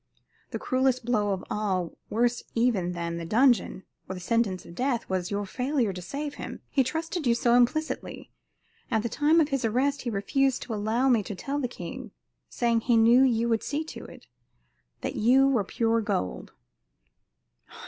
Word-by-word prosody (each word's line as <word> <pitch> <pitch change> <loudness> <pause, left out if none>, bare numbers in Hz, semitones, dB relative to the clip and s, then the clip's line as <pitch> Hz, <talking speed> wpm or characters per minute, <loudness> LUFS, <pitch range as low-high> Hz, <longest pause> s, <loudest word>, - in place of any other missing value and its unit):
"The - - -4
cruelest 255 -1 0
blow 215 -4 +1
of 190 -2 -2
all, 190 -5 -1
worse 240 +2 +1
even 220 -7 +1
than 170 -1 -3
the 170 - -5
dungeon, 230 +1 +2 0.3
or 190 - -4
the - - -7
sentence 200 -1 0
of - - -11
death, 250 +3 -1
was 185 -1 -2
your 205 0 -2
failure 250 0 -1
to 180 - -7
save 285 - -5
him. - - -7
He 270 - +3
trusted 320 +2 -3
you 235 - +4
so 235 0 +2
implicitly. 245 +6 0 0.6
At 220 -3 +1
the 235 - -1
time 305 +6 +3
of 305 -2 +2
his 275 -3 -1
arrest 260 +6 +1
he 245 - -3
refused 250 +6 0
to 235 - -5
allow 220 +5 0
me 240 -4 +4
to 205 0 -6
tell 280 +9 -3
the 260 - -1
king, 245 - -8 0.4
saying 235 -1 +1
he 235 0 +3
knew 230 +3 +6
you 235 -3 +3
would 225 -1 +1
see 295 +2 -2
to 315 - -9
it - - -13 0.8
that - - -4
you 260 +5 +5
were 250 -6 +2
pure 230 +3 0
gold." 90 - -3
235 Hz, 180 wpm, -27 LUFS, 205-265 Hz, 0.8 s, knew